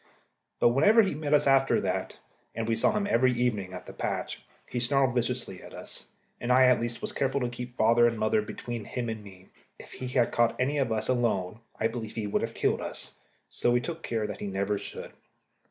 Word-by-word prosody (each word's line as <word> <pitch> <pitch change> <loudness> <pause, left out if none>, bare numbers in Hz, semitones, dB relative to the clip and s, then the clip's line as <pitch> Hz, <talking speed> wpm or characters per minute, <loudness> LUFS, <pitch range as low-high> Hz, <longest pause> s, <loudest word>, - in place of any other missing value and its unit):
But - - +6
whenever 205 - +6
we 195 - 0
met 150 0 -4
him 145 - +6
after 135 0 +4
that - - -2 0.4
and 115 0 -2
we 115 - +2
saw 115 - +3
him 210 -1 0
every 130 -6 +3
evening 115 -6 -1
at 90 -1 -8
the - - -9
patch - - -3 0.2
he 125 - -3
snarled 130 +1 +2
viciously 120 -6 -2
at - - -11
us, - - -6 0.3
and 120 - -1
I, 130 +1 +7
at 125 -2 +4
least, 120 0 -4
was - - -3
careful 135 0 0
to 125 - 0
keep 120 +1 -8
father 115 +2 +5
and 115 -1 -1
mother 110 0 +2
between 115 +1 -6
him 120 -2 -3
and 110 -1 -5
me. 95 -2 -14 0.3
If - - -13
he 130 - -5
had 125 -2 +2
caught 120 -1 +2
any 140 +4 +1
one 135 - +2
of - - -6
us 110 0 -1
alone, 110 -5 0 0.2
I 110 - +3
believe 115 -1 -6
he 110 - -2
would 100 - 0
have - - -4
killed - - +1
us; - - -5 0.3
so - - -1
we 120 0 +4
took 165 +6 -5
care 115 -7 -2
that 105 -1 -5
he - - -4
never 100 +1 -1
should. - - -7
120 Hz, 230 wpm, -28 LUFS, 110-130 Hz, 0.4 s, I